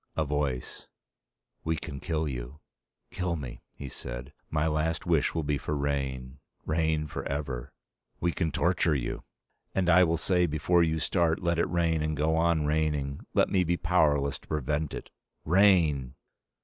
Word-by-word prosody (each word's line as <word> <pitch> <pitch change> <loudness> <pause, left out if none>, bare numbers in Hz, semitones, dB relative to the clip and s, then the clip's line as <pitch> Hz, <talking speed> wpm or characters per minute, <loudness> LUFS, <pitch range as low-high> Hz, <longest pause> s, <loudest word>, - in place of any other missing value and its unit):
A 80 - +2
voice: 70 -3 -2 0.8
"We 80 0 0
can 75 -3 -6
kill 80 -1 -1
you." 65 +1 -6 0.5
"Kill 90 -2 -1
me," 65 -6 -7
he 70 - -9
said. - - -7 0.2
"My 75 0 +1
last 80 0 0
wish 80 -3 +2
will 80 - 0
be 70 -1 0
for 75 - -2
rain. 70 -2 -2 0.3
Rain, 80 -1 +1
forever." 70 -4 -4 0.5
"We 85 - +1
can 80 -2 -1
torture 85 -2 +2
you." - - -3 0.5
"And 90 -2 +2
I 90 +1 +7
will 85 -1 +2
say, 90 +2 +2
before 80 +3 +2
you 80 -1 +2
start, 85 +1 +1
let 85 -1 +1
it - - +1
rain 85 -2 +1
and 75 -1 -1
go 80 +2 +2
on 80 -2 +2
raining. 75 -2 -1
Let - - +4
me 95 -2 +3
be 85 0 0
powerless 75 -6 +2
to - - -22
prevent 75 0 -1
it. - - -8 0.3
Rain!" 80 -8 +4
75 Hz, 160 wpm, -29 LUFS, 70-85 Hz, 0.8 s, I